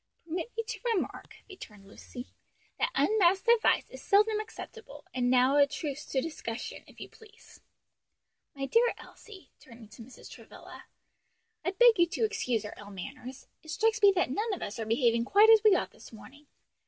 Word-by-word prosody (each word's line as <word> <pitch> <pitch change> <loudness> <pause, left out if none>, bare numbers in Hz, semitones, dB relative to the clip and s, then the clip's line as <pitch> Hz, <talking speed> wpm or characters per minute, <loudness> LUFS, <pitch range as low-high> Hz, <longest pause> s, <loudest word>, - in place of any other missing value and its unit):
"Permit 345 +8 -5
me 455 - -1
to - - -7 0.2
remark," 375 - -5
returned 210 - -13
Lucy, 245 +4 -11 0.5
"that - - +1
unmasked 385 - +2
advice 465 -1 +3
is - - -10
seldom 425 +1 +3
acceptable, 445 +1 -10
and 245 -1 0
now 255 +2 +3
a 285 -1 +5
truce 295 0 -6
to 265 - -1
discussion, 250 -7 -6
if - - -18
you - - -8
please. 440 0 -19 0.9
My 275 -1 -4
dear 465 - +2
Elsie," 380 -10 -15
turning 230 -3 -15
to 225 - -14
Mrs. 250 +3 -13
Travilla, - - -13 0.8
"I 350 - 0
beg 450 +2 +4
you 345 - +5
to 375 +6 -1
excuse 255 - -2
our 210 - -7
ill 205 -1 -11
manners. 255 +7 -9 0.2
It 315 - -16
strikes 445 +6 0
me 405 -1 +7
that 350 -8 0
none 430 - -2
of - - -8
us 205 - -6
are 220 - -4
behaving 230 0 +2
quite 420 - +6
as 445 -1 +7
we 425 -3 +6
ought - - -2
this - - -15
morning. 275 +7 -15
315 Hz, 180 wpm, -29 LUFS, -, 0.9 s, me